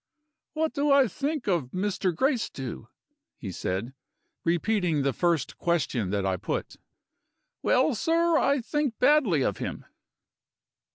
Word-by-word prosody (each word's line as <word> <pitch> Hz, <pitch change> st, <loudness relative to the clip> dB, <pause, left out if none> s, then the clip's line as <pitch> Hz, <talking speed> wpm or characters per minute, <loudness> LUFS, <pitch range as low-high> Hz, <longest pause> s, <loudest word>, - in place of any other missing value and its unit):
"What 315 Hz, 0 st, -1 dB
do 290 Hz, 0 st, 0 dB
I 275 Hz, -2 st, +6 dB
think 280 Hz, -, -3 dB
of 175 Hz, -8 st, +1 dB
Mr. 190 Hz, +2 st, -1 dB
Gracedieu?" 170 Hz, -, -2 dB, 0.5 s
he 100 Hz, -, -6 dB
said, 95 Hz, +8 st, -3 dB, 0.5 s
repeating 175 Hz, -3 st, +1 dB
the 140 Hz, -1 st, +1 dB
first 170 Hz, -4 st, 0 dB
question 145 Hz, -, 0 dB
that 100 Hz, 0 st, -1 dB
I 95 Hz, -1 st, 0 dB
put. -, -, -4 dB, 0.8 s
"Well, 260 Hz, +3 st, +3 dB
sir, 330 Hz, +7 st, +2 dB
I 280 Hz, -3 st, +3 dB
think 285 Hz, -1 st, -1 dB
badly 250 Hz, -, +4 dB
of 100 Hz, -, -1 dB
him." -, -, -5 dB
185 Hz, 125 wpm, -27 LUFS, -, 0.8 s, I